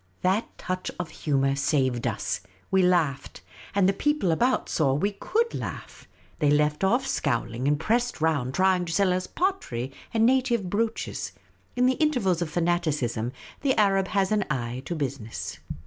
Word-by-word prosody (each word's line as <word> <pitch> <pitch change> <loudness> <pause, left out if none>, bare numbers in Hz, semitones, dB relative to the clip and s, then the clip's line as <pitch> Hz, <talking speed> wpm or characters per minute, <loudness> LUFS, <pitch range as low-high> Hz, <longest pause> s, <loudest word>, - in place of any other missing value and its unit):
That 195 +5 0
touch 185 0 -3
of 180 -2 -4
humour 135 -2 +1
saved 135 -4 +1
us. - - -2 0.3
We 190 0 +4
laughed; 170 -7 +1 0.3
and 195 -2 +4
the 195 - +3
people 295 - +1
about 245 +10 +1
saw 135 -4 +2
we 200 +8 +1
could 460 - -1
laugh. - - -6 0.3
They 150 -3 +3
left 150 +3 +2
off 245 +7 +3
scowling, 120 - -1
and 145 0 +2
pressed 240 +6 0
around 145 -5 0
trying 185 -1 +3
to 165 - -4
sell 190 0 +3
us 185 0 -2
pottery 140 - -2 0.2
and 225 -1 +3
native 240 -7 +2
brooches. 225 +2 -2 0.4
In 250 0 +3
the 255 0 +3
intervals 225 - +2
of 170 - -1
fanaticism, 155 -10 0 0.3
the 270 -2 +2
Arab 195 -2 +3
has 195 -1 +1
an 210 -1 +2
eye 125 -3 -2
to 175 - -3
business. 135 -7 -4
180 Hz, 165 wpm, -26 LUFS, 140-215 Hz, 0.4 s, We